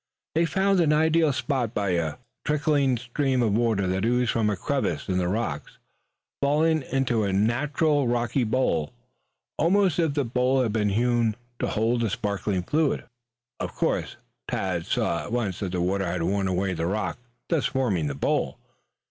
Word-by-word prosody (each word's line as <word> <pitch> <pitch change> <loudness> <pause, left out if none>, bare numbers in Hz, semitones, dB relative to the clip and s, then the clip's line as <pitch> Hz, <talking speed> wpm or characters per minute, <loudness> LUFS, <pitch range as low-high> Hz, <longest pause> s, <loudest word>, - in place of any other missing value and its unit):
They 165 +2 +3
found 190 +3 +2
an 160 -3 +3
ideal 160 0 +3
spot 125 -2 -1
by 100 -2 0
a 85 -4 0 0.3
trickling 145 -3 +2
stream 125 +1 0
of 110 -3 +1
water 110 -3 +1
that 95 +1 -1
oozed 125 0 +2
from 110 -2 +1
a 105 - -1
crevice - - -1
in 90 -1 0
the 90 - 0
rocks, 95 -7 -3 0.6
falling 155 +3 +2
into 130 -4 0
a 100 - 0
natural 140 +7 +1
rocky 120 +2 +1
bowl, 110 - 0 0.7
almost 180 +1 +3
if 160 -4 +1
the 145 -3 +1
bowl 125 +2 +2
had 110 -4 -1
been 105 -2 +1
hewn 115 +1 +1 0.2
to - - 0
hold 115 +2 +1
the 115 - +1
sparkling 100 -1 -2
fluid. 150 - +1 0.6
Of - - -4
course - - -1 0.3
Tad 90 -3 -2
saw - - 0
at - - -8
once 110 -7 -1
that 95 -3 -3
the 90 - 0
water 95 +1 0
had 85 0 -2
worn 100 +2 0
away 95 +1 0
the 85 -1 -2
rock, 95 -1 -2 0.3
thus 165 -5 +2
forming 105 - 0
the 70 - -3
bowl. 70 - 0
120 Hz, 175 wpm, -25 LUFS, 95-140 Hz, 0.7 s, They